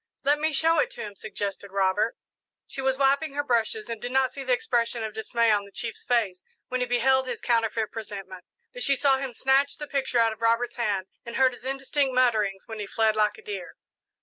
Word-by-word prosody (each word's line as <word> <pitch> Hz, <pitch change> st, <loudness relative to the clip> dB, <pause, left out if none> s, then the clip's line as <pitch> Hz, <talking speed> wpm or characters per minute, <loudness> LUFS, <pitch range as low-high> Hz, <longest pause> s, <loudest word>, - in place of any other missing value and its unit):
"Let 290 Hz, +2 st, +3 dB
me 315 Hz, +1 st, +1 dB
show 325 Hz, +2 st, +3 dB
it -, -, +2 dB
to -, -, -7 dB
him," 210 Hz, -1 st, -6 dB
suggested 200 Hz, -1 st, -5 dB
Robert. 195 Hz, +3 st, +1 dB, 0.5 s
She 270 Hz, -, -6 dB
was 265 Hz, 0 st, +1 dB
wiping 280 Hz, +2 st, +2 dB
her 290 Hz, -, 0 dB
brushes 225 Hz, -4 st, 0 dB
and 230 Hz, -2 st, -5 dB
did 245 Hz, -, -4 dB
not 265 Hz, 0 st, +2 dB
see 275 Hz, -, -7 dB
the 260 Hz, -, -2 dB
expression 235 Hz, -1 st, +1 dB
of 220 Hz, -1 st, -4 dB
dismay 230 Hz, +1 st, +1 dB
on 205 Hz, -1 st, +2 dB
the 200 Hz, -, -14 dB
chief's 225 Hz, +2 st, -5 dB
face 210 Hz, -7 st, +1 dB, 0.3 s
when 255 Hz, -, -1 dB
he 250 Hz, -, 0 dB
beheld 260 Hz, +2 st, +3 dB
his 245 Hz, -3 st, -3 dB
counterfeit 225 Hz, -2 st, 0 dB
presentment, 195 Hz, -4 st, -7 dB, 0.3 s
but -, -, -7 dB
she 280 Hz, -, +4 dB
saw 270 Hz, 0 st, +3 dB
him 270 Hz, -1 st, -3 dB
snatch 270 Hz, +3 st, +2 dB
the 295 Hz, -, -5 dB
picture 270 Hz, -3 st, -1 dB
out 230 Hz, -1 st, +4 dB
of 220 Hz, -, -16 dB
Robert's 230 Hz, +2 st, +1 dB
hand 205 Hz, -5 st, 0 dB, 0.2 s
and 235 Hz, -, -7 dB
heard 260 Hz, -1 st, +4 dB
his 245 Hz, -, -13 dB
indistinct 270 Hz, 0 st, 0 dB
mutterings 215 Hz, -6 st, +2 dB
when 225 Hz, -1 st, -7 dB
he 205 Hz, -, -4 dB
fled 220 Hz, 0 st, +2 dB
like 210 Hz, -1 st, +2 dB
a 445 Hz, -, -14 dB
deer. 420 Hz, -2 st, -6 dB
240 Hz, 225 wpm, -26 LUFS, 215-265 Hz, 0.5 s, she